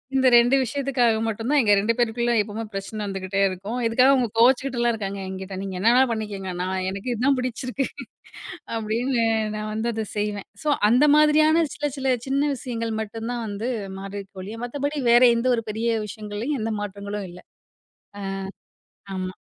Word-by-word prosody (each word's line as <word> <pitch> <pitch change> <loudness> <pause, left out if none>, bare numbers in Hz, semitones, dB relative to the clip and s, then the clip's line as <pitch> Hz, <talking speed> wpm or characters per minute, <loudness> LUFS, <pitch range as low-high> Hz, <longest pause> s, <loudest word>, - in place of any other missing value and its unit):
இந்த 260 -1 +4
2 240 +3 +6
விஷயத்துக்காக 255 -2 +1
மட்டும் 225 +3 -3
தான் 295 - +5
எங்க 210 -3 +3
2 225 +3 +1
பேத்துக்குள்ள 240 0 +1
எப்பவுமே 215 +2 -5
பிரச்சனை 195 +2 -5
வந்துகிட்டே 195 0 -3
இருக்கும். 200 +6 -4
இதுக்காக 255 +4 +5
அவங்க 255 -3 +2
கோச்சுக்கிட்டுலாம் 245 -1 +3
இருக்காங்க 200 -2 -4
என்கிட்ட. 190 0 -6
"நீங்க 195 -1 -5
என்ன 220 +4 +4
வேணா 260 - +6
பண்ணிக்குங்க. 205 -4 -4
நான் 185 0 -2
எனக்கு 200 +6 -4
இது 235 - -3
தான் 275 -1 +4
பிடிச்சிருக்கு." 255 +2 -2 0.9
அப்டின்னு, 230 +2 0 0.3
நான் 215 0 -4
வந்து 225 +2 -1
அத 220 -1 -3
செய்வேன். 205 -1 -2 0.2
சோ 300 - +2 0.2
அந்த 250 +5 +5
மாதிரியான 310 +2 +5
சில, 295 -1 -2
சில 265 -1 +2
சின்ன 280 +2 +1
விஷயங்கள் 230 -3 -4
மட்டுந்தான் 230 +2 -5
வந்து 205 +4 -4 0.3
மாறிருக்கே 195 0 -8
ஒழிய, 215 +4 -7
மத்தபடி 285 +4 -3
வேற 240 +1 +6
எந்த 235 +2 -1
ஒரு 230 - -3
பெரிய 225 +1 0
விஷயங்கள்லயும் 215 +6 -4
எந்த 225 - -1
மாற்றங்களும் 200 0 -5
இல்ல. 180 - -12 0.8
அ. - - -5 0.9
ஆமா. 185 0 -4
225 Hz, 165 wpm, -24 LUFS, 205-255 Hz, 0.9 s, 2